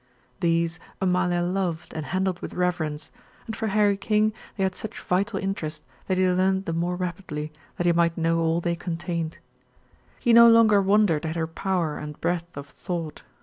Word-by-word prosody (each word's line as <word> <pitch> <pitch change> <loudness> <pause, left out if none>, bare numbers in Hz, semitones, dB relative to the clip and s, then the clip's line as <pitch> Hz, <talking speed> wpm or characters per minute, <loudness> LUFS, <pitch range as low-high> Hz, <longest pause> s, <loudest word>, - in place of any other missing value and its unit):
These 170 -1 +1 0.2
Amalia 180 -1 +1
loved 175 -2 -2
and 155 -2 -5
handled 185 0 -1
with - - -7
reverence, 165 -4 -2 0.3
and 220 - -5
for 220 - -2
Harry 205 -1 +3
King 215 +1 +1 0.2
they 195 - 0
had 190 -1 +1
such 220 +4 -6
vital 195 +3 0
interest 190 -6 -3 0.2
that 185 - +1
he 185 0 +3
learned 190 +1 +2
the 165 - -2
more 175 +2 -1
rapidly 170 -4 -4 0.3
that 175 - -1
he 175 - +4
might 170 0 +2
know 165 0 +1
all 165 +1 +1
they 170 0 0
contained. 170 -1 -4 0.8
He 240 - +3
no 235 0 +9
longer 225 -3 +6
wondered 195 -5 +3
at 160 0 -3
her 165 -1 0
power 165 -1 -2
and 150 -1 -7
breadth 170 -1 -2
of 140 - -6
thought. 165 +1 -5
175 Hz, 180 wpm, -25 LUFS, 165-195 Hz, 0.8 s, no